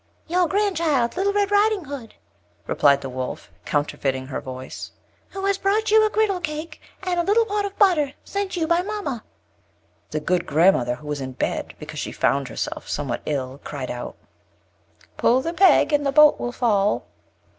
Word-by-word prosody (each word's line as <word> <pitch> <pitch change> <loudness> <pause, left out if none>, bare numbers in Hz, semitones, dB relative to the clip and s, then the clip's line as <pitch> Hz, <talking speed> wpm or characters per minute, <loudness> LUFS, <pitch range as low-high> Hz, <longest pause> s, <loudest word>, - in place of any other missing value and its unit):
"Your 355 +1 +2
grand 405 +1 0
child, 285 -8 +1
Little 390 +2 +1
Red 405 0 +1
Riding 410 -3 +3
Hood," 270 -5 -8 0.5
replied 140 -1 +3
the 135 - -5
Wolf, 130 0 -5
counterfeiting 135 -3 -1
her 130 - -5
voice, 130 0 -7 0.4
"who 390 0 -5
has 395 -1 +1
brought 420 +3 +1
you 440 0 +6
a 430 - +3
girdle 425 -3 +1
cake, 310 -1 -5 0.2
and 360 -2 0
a - - +2
little 435 +5 +3
pot 415 -1 -1
of 400 0 -6
butter, 315 -9 +3
sent 395 -2 -3
you 330 - +1
by 340 +2 +2
mamma." 375 - -4 0.9
The 155 - -2
good 175 +3 0
grand 170 +6 +5
mother, 120 0 -1
who 150 - -15
was 145 -1 -3
in 130 -1 -5
bed, - - -3
because - - -8
she - - -4
found 135 +2 +1
herself 115 - -5
somewhat 140 -5 -2
ill, 135 -2 -3
cry'd 135 -3 -5
out: 120 0 -6 1.0
"Pull 250 +2 +3
the 330 +5 -3
peg, 365 -4 +5
and 290 0 +3
the 275 - +1
bolt 300 +1 +6
will 240 - -3
fall." 210 -5 +1
295 Hz, 185 wpm, -23 LUFS, -, 1.0 s, you